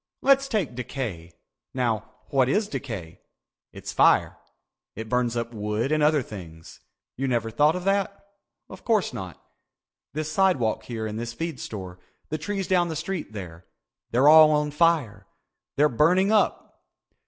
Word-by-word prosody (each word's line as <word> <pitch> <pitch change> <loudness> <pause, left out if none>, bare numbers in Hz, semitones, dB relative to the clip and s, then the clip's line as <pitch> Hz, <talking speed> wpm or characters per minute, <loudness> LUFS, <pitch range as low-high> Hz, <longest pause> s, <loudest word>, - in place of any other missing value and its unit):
Let's 275 0 +4
take 210 - -1
decay. 115 -9 -5 0.4
Now 115 -4 -2 0.2
what 130 -2 +3
is 205 +8 +1
decay? 110 - -7 0.5
It's - - -8
fire. - - +3 0.6
It 110 +1 -7
burns 120 -1 0
up 115 0 -3
wood 105 +4 -2
and 155 0 +2
other 150 -2 +3
things. 85 -7 -11 0.4
You 135 +2 -1
never 115 -3 -1
thought 150 +7 +3
of 180 - -4
that? 200 +1 0 0.5
Of - - -12
course 220 -5 +1
not. 90 -2 -7 0.8
This 155 0 -3
sidewalk 155 - +1
here 115 -2 -4
and 110 0 -4
this 120 0 -5
feed 165 0 -5
store, 95 -5 -7 0.3
the 155 - -3
trees 195 +3 -3
down 180 -2 +2
the 160 - -4
street 180 -1 -4
there—they're 95 - -4
all 155 0 +9
on 150 -1 +1
fire. 150 -8 +1 0.5
They're 150 +2 +4
burning 180 - +3
up. 215 -2 0
135 Hz, 150 wpm, -25 LUFS, 110-170 Hz, 0.8 s, all